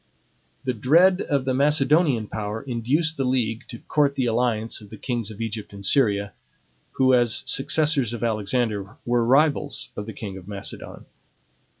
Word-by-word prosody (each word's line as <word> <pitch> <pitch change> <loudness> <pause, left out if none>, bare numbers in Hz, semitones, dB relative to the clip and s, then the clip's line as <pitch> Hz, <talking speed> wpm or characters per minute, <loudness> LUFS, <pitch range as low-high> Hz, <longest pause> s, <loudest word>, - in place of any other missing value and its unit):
The 130 -2 -1
dread 170 - +4
of 140 -3 -1
the 130 - 0
Macedonian 145 -2 +3
power 105 +1 -5
induced 140 +6 0
the 135 - 0
league 120 -3 -1
to 115 - -8
court 145 -2 +1
the 130 - 0
alliance 115 -1 0
of 105 - -14
the - - -10
Kings 120 -5 -2
of 110 - -10
Egypt 110 -2 -5
and 100 -1 -7
Syria, 100 -7 +2 0.6
who, 130 -1 +3
as 120 -3 +3
successors 145 -3 +2
of 120 -1 -5
Alexander, 110 -2 -1
were 120 0 +1
rivals 140 +3 +1
of 105 - -6
the 110 - -6
king 100 -3 -7
of 90 -1 -12
Macedon. 100 -1 -5
120 Hz, 165 wpm, -23 LUFS, 110-140 Hz, 0.6 s, dread